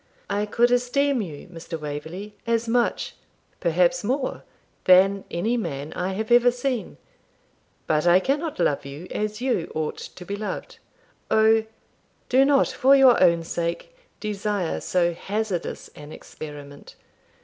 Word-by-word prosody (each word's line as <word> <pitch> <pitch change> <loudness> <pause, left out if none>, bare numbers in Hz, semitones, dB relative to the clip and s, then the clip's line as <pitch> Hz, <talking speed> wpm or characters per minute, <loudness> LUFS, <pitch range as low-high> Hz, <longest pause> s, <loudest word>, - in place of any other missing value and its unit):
'I 205 +1 0
could 240 +3 +2
esteem 250 +2 +2
you, 160 -6 -8
Mr. 165 -1 -7
Waverley, 160 +8 -6
as 230 0 +1
much, 240 +1 0 0.5
perhaps 175 +8 +2
more, 260 +4 -2 0.4
than 195 +2 +5
any 220 +8 -1
man 150 -8 -4
I 185 +2 -2
have 220 +4 -4
ever 240 +1 +6
seen; 245 -1 -3 0.9
but 155 +2 +1
I 175 +1 +6
cannot 295 - -1
love 140 - +1
you 140 +5 -8
as 215 +1 -3
you 250 -10 -1
ought 155 -1 -2
to 180 - -10
be 200 - -4
loved. 210 +1 -6 0.5
O! 220 0 +4 0.6
do 260 +1 +5
not, 275 0 +3
for 270 +2 +4
your 265 -3 +6
own 170 -2 +4
sake, 170 - -4 0.2
desire 205 -4 -2
so 175 -1 +1
hazardous 205 0 -3
an 150 0 -12
experiment! 145 -3 -10
205 Hz, 140 wpm, -24 LUFS, 170-240 Hz, 0.9 s, ever